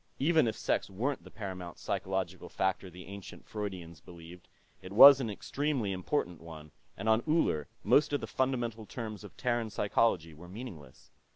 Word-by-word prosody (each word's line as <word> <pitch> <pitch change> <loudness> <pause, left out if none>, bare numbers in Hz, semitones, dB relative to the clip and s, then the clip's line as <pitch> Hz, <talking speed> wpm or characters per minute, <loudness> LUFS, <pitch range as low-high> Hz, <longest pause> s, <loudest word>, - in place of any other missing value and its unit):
Even 155 -1 +3
if 110 - -1
sex - - 0
weren't 120 +9 -2
the - - -12
paramount 95 -5 -7
psychological - - -3
factor 95 0 -1
the 90 0 -11
ancient 100 -1 -10
Freudians 90 -7 -6
believed, 85 +1 -13 0.3
it 95 - -10
was 135 +6 +10
an 115 - -2
extremely 135 +1 -2
important 90 - -2
one, 80 -2 -11 0.3
and 100 - -5
on 110 +1 +4
Uller 150 - +1 0.2
most 145 - +4
of 145 - +1
the - - -5
fundamental 120 -4 -2
terms 110 -4 -6
of 105 - -12
Terran 120 -3 0
psychology 100 -6 +1
were 85 +3 -13
meaningless. 90 - -10
100 Hz, 165 wpm, -31 LUFS, 90-120 Hz, 0.3 s, was